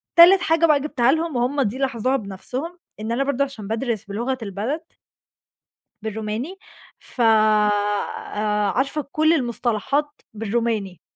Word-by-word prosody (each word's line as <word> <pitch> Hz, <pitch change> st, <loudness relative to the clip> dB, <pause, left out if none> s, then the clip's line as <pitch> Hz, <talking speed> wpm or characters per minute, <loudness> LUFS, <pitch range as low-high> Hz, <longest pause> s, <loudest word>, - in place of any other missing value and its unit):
تالت 355 Hz, +2 st, +8 dB
حاجة 330 Hz, 0 st, +3 dB
بقى 300 Hz, -3 st, +4 dB
جِبتها 265 Hz, -4 st, +2 dB
لهم 320 Hz, 0 st, -1 dB
وهُم 250 Hz, +4 st, +1 dB
دي 235 Hz, -1 st, -1 dB
لاحظوها 265 Hz, -1 st, 0 dB
بنَفْسهم 255 Hz, -, -6 dB, 0.2 s
إن 220 Hz, +2 st, -4 dB
أنا 250 Hz, +4 st, +1 dB
برضه 280 Hz, 0 st, +1 dB
عشان 270 Hz, -7 st, -7 dB
بادرس 225 Hz, -1 st, -2 dB
بلغة 235 Hz, +6 st, -2 dB
البلد 220 Hz, -, -3 dB, 1.2 s
بالروماني، 220 Hz, -, -4 dB, 0.4 s
ف 250 Hz, -, -6 dB
آآ 210 Hz, -1 st, +2 dB
عارفة 275 Hz, +4 st, 0 dB
كل 315 Hz, +1 st, +3 dB
المصطلحات 265 Hz, +2 st, -1 dB
بالروماني. 220 Hz, -3 st, -2 dB
240 Hz, 125 wpm, -22 LUFS, 215-280 Hz, 1.2 s, تالت